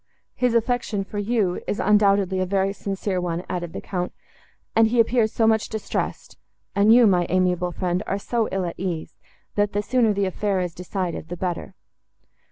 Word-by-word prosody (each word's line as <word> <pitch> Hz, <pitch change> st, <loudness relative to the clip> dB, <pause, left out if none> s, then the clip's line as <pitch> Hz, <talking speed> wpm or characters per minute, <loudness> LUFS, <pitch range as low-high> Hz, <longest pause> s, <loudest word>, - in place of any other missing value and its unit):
"His 250 Hz, -2 st, +1 dB
affection 230 Hz, -3 st, 0 dB
for 205 Hz, +2 st, -6 dB
you 205 Hz, -4 st, 0 dB
is, 205 Hz, -, -2 dB
undoubtedly, 200 Hz, -2 st, +3 dB
a 185 Hz, -, +1 dB
very 195 Hz, +1 st, +1 dB
sincere 195 Hz, -2 st, -3 dB
one," 175 Hz, 0 st, -2 dB
added 175 Hz, -2 st, -4 dB
the -, -, -6 dB
Count; 180 Hz, -2 st, -3 dB, 0.6 s
"and 225 Hz, 0 st, +6 dB
he 235 Hz, +2 st, +1 dB
appears 225 Hz, -1 st, +3 dB
so 225 Hz, -, +1 dB
much 220 Hz, -1 st, +2 dB
distressed, 220 Hz, -1 st, -4 dB, 0.4 s
and 200 Hz, +2 st, +5 dB
you, 240 Hz, +1 st, +7 dB
my 180 Hz, -4 st, +3 dB
amiable 180 Hz, -1 st, +1 dB
friend, 180 Hz, +1 st, -1 dB
are 195 Hz, -, 0 dB
so 225 Hz, +2 st, -1 dB
ill 190 Hz, -1 st, -1 dB
at 170 Hz, -, -6 dB
ease—that 190 Hz, +3 st, -4 dB
the 205 Hz, +1 st, 0 dB
sooner 240 Hz, -1 st, +2 dB
the 200 Hz, -1 st, 0 dB
affair 195 Hz, +1 st, -1 dB
is 180 Hz, -2 st, -2 dB
decided, 180 Hz, -2 st, -4 dB
the 175 Hz, -, -5 dB
better." 175 Hz, -1 st, -4 dB
195 Hz, 175 wpm, -23 LUFS, 180-220 Hz, 0.6 s, you